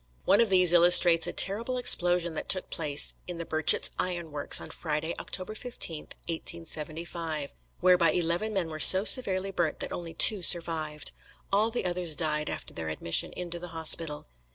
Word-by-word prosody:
One 205 - +1
of 230 - -1
these 180 -2 +3
illustrates 175 -1 +5
a - - -6
terrible 230 +7 +1
explosion 175 -7 +1
that - - -9
took 185 - 0
place 150 -3 0
in 175 -1 -8
the 170 - -9
Birchett's 155 -1 +3
Iron 175 -3 -5
Works, 145 -1 +1
on - - -11
Friday, 160 +1 -6
October 185 +3 -4
15, 215 -9 -4 0.2
1875, 165 -2 -4 0.3
whereby 180 -2 +1
eleven 175 +6 -4
men 190 -5 -5
were 155 -1 -10
so 190 +4 +8
severely 195 -5 +3
burnt 170 -4 -5
that - - -7
only 165 -2 -10
two 205 +3 +4
survived. 160 -4 +1 0.4
All 210 +3 0
the 230 -4 -6
others 175 -3 +1
died 150 -2 -3
after - - -9
their 80 -1 -8
admission 80 +1 -2
into 175 -1 -9
the 175 - -11
hospital. 160 -1 +1
170 Hz, 170 wpm, -24 LUFS, 160-185 Hz, 0.4 s, so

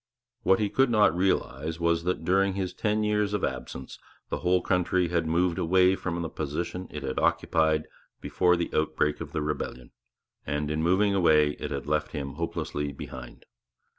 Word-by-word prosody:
What 95 - +4
he 105 - +1
could 135 -1 +3
not 105 -5 +4
realize 80 -4 -1
was, 85 0 +1
that 90 -3 -1
during 95 +2 +3
his 95 -2 -2
ten 105 0 0
years 105 -1 +1
of 105 - -3
absence 65 - -5 0.3
the - - -2
whole 90 0 +2
country 90 -1 +1
had 85 -1 0
moved 85 +1 +1
away 95 +2 +4
from 85 -2 -3
the - - -2
position 85 +5 -4
it 75 -1 -7
had 65 -1 -2
occupied 80 -1 +2 0.3
before 90 -1 +2
the 85 0 -2
outbreak 75 -1 0
of - - -6
the 75 - -2
rebellion; 65 -4 -4 0.5
and, 75 +1 -2
in 75 +1 -1
moving 95 +5 +3
away, 75 -6 +4
it - - -4
had 70 -2 -4
left 75 +1 -1
him 70 -3 -4
hopelessly 75 -2 -3
behind. 65 -2 -10
85 Hz, 175 wpm, -27 LUFS, 75-95 Hz, 0.5 s, What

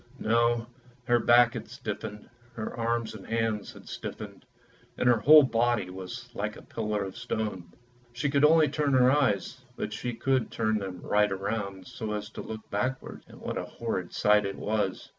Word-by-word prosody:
No; 115 +1 +2 0.4
her 120 0 +3
back 120 +1 +5
had - - -6
stiffened, 105 0 -6 0.3
her 110 - -5
arms 115 -1 -1
and 105 -3 -10
hands 115 -2 -1
had - - -14
stiffened, - - -7 0.5
and 125 - +1
her 120 -2 +5
whole 150 +6 +8
body 120 -6 +1
was 105 +7 -7
like 105 -1 -3
a - - -12
pillar 105 -2 -2
of 95 -1 -7
stone. 110 -7 -4 0.4
She 120 +5 -2
could 140 0 +2
only 155 0 +6
turn 145 -2 0
her 130 0 +6
eyes, 130 -3 +1
but 105 - -4
she 120 +2 -4
could 130 0 +1
turn 110 -1 0
them 95 -3 -6
right 105 0 +2
round, 100 -2 -3
so 110 +2 -5
as 105 +1 -5
to - - -7
look 110 -1 -8
backwards; 130 +6 -3
and - - -14 0.2
a - - -3
horrid 95 -6 -4
sight 105 0 +4
it 100 - -6
was. 105 -3 -2
115 Hz, 180 wpm, -28 LUFS, 105-120 Hz, 0.5 s, whole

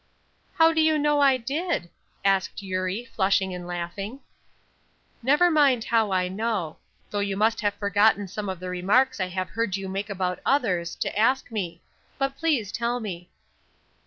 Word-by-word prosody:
"How 325 0 +5
do 320 - +3
you 315 0 +3
know 295 0 +2
I 270 -2 +5
did?" 270 - -2 0.3
asked 195 +1 +1
Eurie, 185 +4 -2
flushing 195 -3 +1
and 180 -1 -7
laughing. 195 +8 -5 1.0
"Never 295 +8 +4
mind 280 -7 +4
how 225 -3 +1
I 185 -1 +1
know; 195 -4 -2 0.3
though 205 - -1
you 200 -1 -1
must 220 +2 +2
have 205 -1 0
forgotten 205 0 +2
some 205 +2 -5
of 185 -2 -4
the 185 0 -5
remarks 205 +9 +2
I 185 - 0
have 185 0 -3
heard 225 -4 -1
you 195 -1 -5
make 195 +2 -4
about 185 -2 -2
others, 180 -11 +1
to - - -3
ask 250 +5 +2
me. 175 -6 -4 0.4
But 275 0 -1
please 275 -11 0
tell 240 +1 -1
me." 180 -6 -6
205 Hz, 165 wpm, -25 LUFS, 185-255 Hz, 1.0 s, How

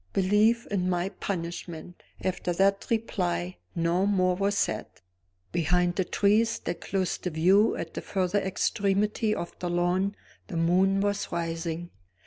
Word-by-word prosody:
"Believe 210 +5 +3
in 185 -2 0
my 180 +1 0
punishment!" 175 -2 -5 0.2
After 180 -1 -1
that 195 +2 +2
reply, 90 - -1 0.2
no 170 +3 +1
more 185 -3 +2
was 200 +2 0
said. 110 - 0 0.6
Behind 175 +1 +1
the 190 - +1
trees 215 +5 +2
that 170 0 -4
closed 190 -3 -1
the 180 - 0
view 185 +7 +4
at - - -5
the - - -4
further 190 +1 0
extremity 200 +2 0
of 170 - -4
the 175 - -2
lawn 180 +3 +1 0.3
the 175 - -4
moon 185 +4 +3
was 205 0 -1
rising. 165 0 -3
185 Hz, 140 wpm, -27 LUFS, 175-200 Hz, 0.6 s, view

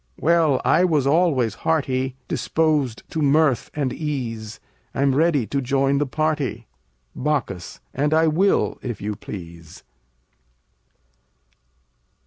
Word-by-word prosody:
Well, 160 -4 +3
I 170 - +4
was 155 -7 +2
always 140 - +2
hearty, 130 -4 0
Disposed 150 -7 0
to 160 - -2
mirth 145 -2 +3
and 140 -4 -1
ease: 115 -8 -4 0.4
I'm 140 0 +2
ready 150 -3 +2
to 140 +5 -2
join 135 +2 +1
the 145 - 0
party. 150 -5 -1 0.5
Bac. 145 -4 0 0.4
And 145 +3 0
I 160 +1 +4
will 175 +6 +2
if 120 -5 -5
you 105 +1 -3
please. 85 -5 -10
140 Hz, 115 wpm, -22 LUFS, 125-155 Hz, 0.5 s, I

